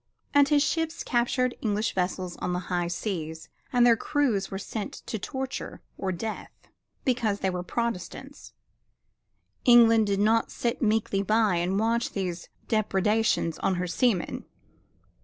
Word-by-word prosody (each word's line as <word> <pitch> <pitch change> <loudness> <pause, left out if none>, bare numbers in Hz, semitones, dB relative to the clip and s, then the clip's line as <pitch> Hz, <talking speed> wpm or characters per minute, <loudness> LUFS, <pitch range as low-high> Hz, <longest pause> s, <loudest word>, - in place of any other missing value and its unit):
And 285 -1 +5
his 290 -1 +4
ships 325 +1 -1
captured 245 +1 +1
English 215 0 0
vessels 180 -1 -2
on 180 - -2
the - - 0 0.2
high 175 -1 +1
seas 165 -3 -4 0.2
and 245 -1 +4
their 235 -1 +6
crews 255 -6 0
were 195 - -4
sent 205 +1 -5
to 220 - -4
torture 265 +4 -5
or 190 - -2
death 210 +5 -5 0.6
because 235 -6 0
they 190 - +1
were 180 0 -3
Protestants. 235 +7 -4 1.1
England 230 -3 +6
did 200 -1 0
not 225 +2 +3
sit 235 0 -2
meekly 215 -3 +1
by 215 -2 +2
and 180 +3 0
watch 230 +2 0
these 180 -3 -4 0.2
depredations 210 -4 +1
on 190 - +1
her 180 0 -1
seamen. 185 +2 0
215 Hz, 140 wpm, -27 LUFS, 185-240 Hz, 1.1 s, their